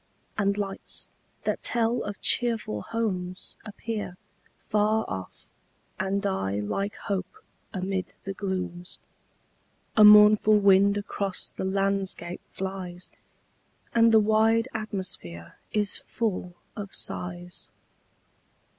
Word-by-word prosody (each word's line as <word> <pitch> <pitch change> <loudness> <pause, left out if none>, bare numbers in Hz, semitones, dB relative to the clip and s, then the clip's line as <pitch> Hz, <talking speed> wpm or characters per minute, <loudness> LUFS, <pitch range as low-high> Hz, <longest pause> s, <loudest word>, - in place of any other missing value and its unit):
And 200 -1 +1
lights, 195 -1 -4 0.3
that - - -1
tell 235 0 +2
of 205 -1 -5
cheerful 225 - 0
homes, 185 - -3
appear 215 -3 -5 0.4
Far 215 +1 +1
off, 95 0 -7 0.5
and 195 +2 0
die 100 - 0
like 195 - -2
hope 220 - -3 0.3
amid 190 -1 -3
the 195 - -4
glooms. 180 -2 -4 1.0
A 215 - +7
mournful 210 0 +8
wind 200 0 +5
across 200 -2 -3
the - - -5
landscape 195 -2 -1
flies, 185 -2 -6 0.8
And 230 0 +6
the 220 - +7
wide 220 +2 +3
atmosphere 185 - -5
is 210 -1 0
full 185 -6 -3 0.2
of 200 -2 -6
sighs. 175 0 -5
195 Hz, 100 wpm, -27 LUFS, 185-215 Hz, 1.0 s, mournful